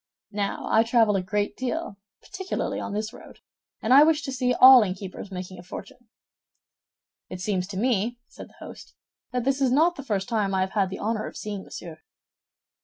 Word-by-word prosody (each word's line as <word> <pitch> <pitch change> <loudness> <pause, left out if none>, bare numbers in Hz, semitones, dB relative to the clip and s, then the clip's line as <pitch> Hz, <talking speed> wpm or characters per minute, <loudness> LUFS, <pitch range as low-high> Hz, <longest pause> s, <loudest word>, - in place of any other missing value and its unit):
Now, 205 -1 -3
I 220 - +4
travel 225 -2 +3
a 195 - +1
great 205 +2 -2
deal, 260 -2 -3 0.3
particularly 380 0 -4
on - - -5
this 215 +3 -3
road, - - -14 0.5
and 225 - +3
I 275 - +9
wish 305 -1 +4
to 270 - -4
see 250 -1 0
all 255 +1 +9
innkeepers 190 0 -5
making 185 -1 -7
a - - -8
fortune." 225 +6 -11 1.2
"It 185 - -7
seems 185 -1 -1
to 195 -2 -7
me," 235 +1 0
said - - -12
the - - -13
host, - - -12 0.4
"that 250 -1 -1
this 275 +2 0
is 260 -2 +3
not 325 +6 +3
the 280 - -7
first 200 -6 -2
time 210 -5 0
I 190 - +1
have 190 0 -1
had 195 -3 +1
the 190 - -6
honor 215 0 -2
of - - -9
seeing 205 -2 -5
Monsieur." 165 -4 -10
215 Hz, 195 wpm, -25 LUFS, 195-255 Hz, 1.2 s, I